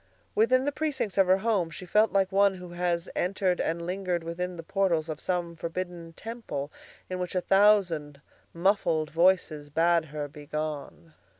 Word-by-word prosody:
Within 255 +4 +3
the 290 - +1
precincts 270 -10 -2
of 190 - +5
her 185 +1 +5
home 195 -5 +1
she 165 +3 -9
felt 210 +5 +3
like 195 -1 +2
one 200 0 +4
who 180 -1 -9
has 175 -1 -1
entered 185 0 0
and 170 +1 -2
lingered 180 -1 -2
within 180 +2 -4
the 165 - -7
portals 170 -4 0
of 155 -1 -4
some 175 -2 -2
forbidden 170 0 -5
temple 165 -11 -6 0.4
in 185 0 -4
which 180 +1 -4
a 180 - +2
thousand 180 -8 +3 0.3
muffled 170 -4 +1
voices 165 -3 +2
bade 165 +2 +3
her 150 -1 -5
begone. 150 +1 -6
180 Hz, 165 wpm, -28 LUFS, 165-195 Hz, 0.4 s, of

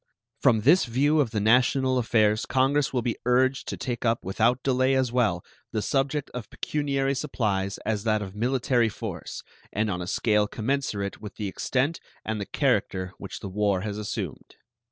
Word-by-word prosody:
From 110 - +4
this 155 - +5
view 145 +6 +2
of 135 -6 +2
the 110 -1 -2
national 125 +4 +3
affairs 110 -3 +2
Congress 135 +2 +2
will 125 -3 -1
be 115 - -2
urged 130 +2 +2
to - - -4
take 120 -2 -4
up 115 -1 +1
without 115 +6 +1
delay 130 0 +2
as 130 -2 +1
well 110 -8 +1 0.3
the 110 - -1
subject 140 +1 0
of 125 -3 -7
pecuniary 140 -2 -1
supplies 105 -9 -1
as 105 -1 -1
that 110 -2 +1
of 95 -2 -8
military 120 0 +1
force, 105 -5 -6 0.3
and 110 +1 0
on 90 -1 -3
a 90 - -5
scale 105 +1 +2
commensurate 110 -4 -2
with 105 -2 -8
the 105 - -3
extent 135 - -1 0.3
and 110 -1 -2
the 100 - -5
character 95 -1 0
which - - -7
the - - -5
war 100 -1 +1
has 105 +1 -4
assumed. 105 - -5
115 Hz, 175 wpm, -26 LUFS, 105-130 Hz, 0.3 s, this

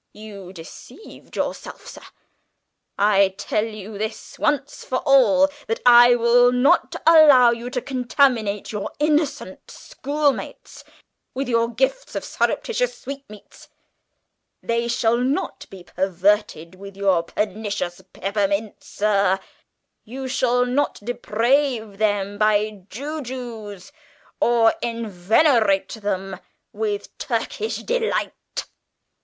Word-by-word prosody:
You 200 -4 -10
deceived 180 - -13
yourself, - - -5
sir! - - -11 1.0
I 200 -1 +3
tell 210 +1 -1
you, 215 -1 -9 0.4
once 290 -1 -1
for 255 - -2
all, 275 +1 +5 0.2
that 225 - -2
I 240 0 +8
will 245 +1 +4
not 250 +3 +2
allow 295 -7 +7
you 235 +1 -4
to 250 -1 -4
contaminate 245 -5 0
your 210 -2 -4
innocent 295 - -1
schoolmates 285 0 -3 0.5
with 270 0 -2
your 230 -1 +2
gifts 265 - -1
of - - -3
surreptitious - - -1
sweetmeats; 275 -6 -11 0.9
they 235 0 -1
shall 235 0 +1
not 255 +4 -2
be 190 -2 -12
perverted 185 -2 0
with 195 +1 -12
your 195 -4 +2
pernicious 200 -1 -4
peppermints, 200 +2 -2
sir; 200 -2 +1 0.6
you 260 +4 -7
shall 250 -1 +1
not 255 +4 0
deprave 235 -1 0
them 205 -1 0
by 210 -2 +1
jujubes, 245 - -7 0.5
or 235 -1 +4
enervate 220 - +1
them 195 -3 -4 0.3
with 420 -2 -4
Turkish 440 - -3
Delight! - - -1
230 Hz, 105 wpm, -22 LUFS, 200-265 Hz, 1.0 s, I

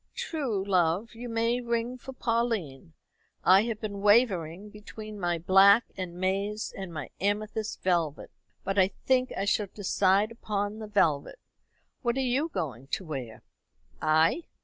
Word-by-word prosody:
"True, 245 - -2
love; 185 +3 +1
you 240 +1 -7
may 230 +2 0
ring 235 +1 -1
for 255 +1 -9
Pauline. 225 - -2 0.5
I 195 +3 +6
have 230 -3 -3
been 205 -2 -5
wavering 205 -3 +2
between 210 0 -9
my 175 -2 0
black 195 +6 +6
and 180 -2 -5
maize 195 +3 -1
and 190 -3 -6
my 155 -3 -6
amethyst 210 +2 -2
velvet, 170 -5 0 0.3
but 195 +1 0
I 185 - +6
think 255 +5 0
I 195 - -1
shall 205 +1 +1
decide 200 +1 +2
upon 210 -2 -3
the 215 - -6
velvet. 165 - +1 0.6
What 240 0 0
are - - +1
you 295 +6 +1
going 140 - -4
to 185 - -3
wear?" 130 -8 -6 0.6
"I? 160 - +3
205 Hz, 150 wpm, -28 LUFS, 180-230 Hz, 0.6 s, I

